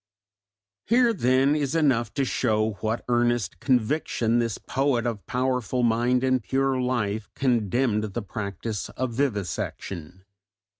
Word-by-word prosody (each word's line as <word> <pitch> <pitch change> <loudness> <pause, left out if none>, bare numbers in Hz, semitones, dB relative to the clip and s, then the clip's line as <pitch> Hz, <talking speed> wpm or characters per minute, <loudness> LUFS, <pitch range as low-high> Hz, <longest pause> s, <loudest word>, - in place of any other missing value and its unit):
'" 100 -1 -68
Here 235 +1 +4
then 135 - +3
is 145 0 -1
enough 135 -7 +2
to 140 -2 +1
show 110 -4 +1
with 110 -2 -4
what 110 +1 -2
earnest 120 -7 +1
conviction 120 - +1
this 115 -2 -1
poet 135 -3 0
of 115 -4 -3
powerful 125 -1 0
mind 120 +2 +2
and 130 -1 +2
pure 135 +2 0
life 110 -4 -1
condemned 120 -2 +1
the 105 +2 -4
practice 100 +1 -4
of 130 -2 -3
vivisection. 95 - -3
120 Hz, 135 wpm, -25 LUFS, 105-130 Hz, -, Here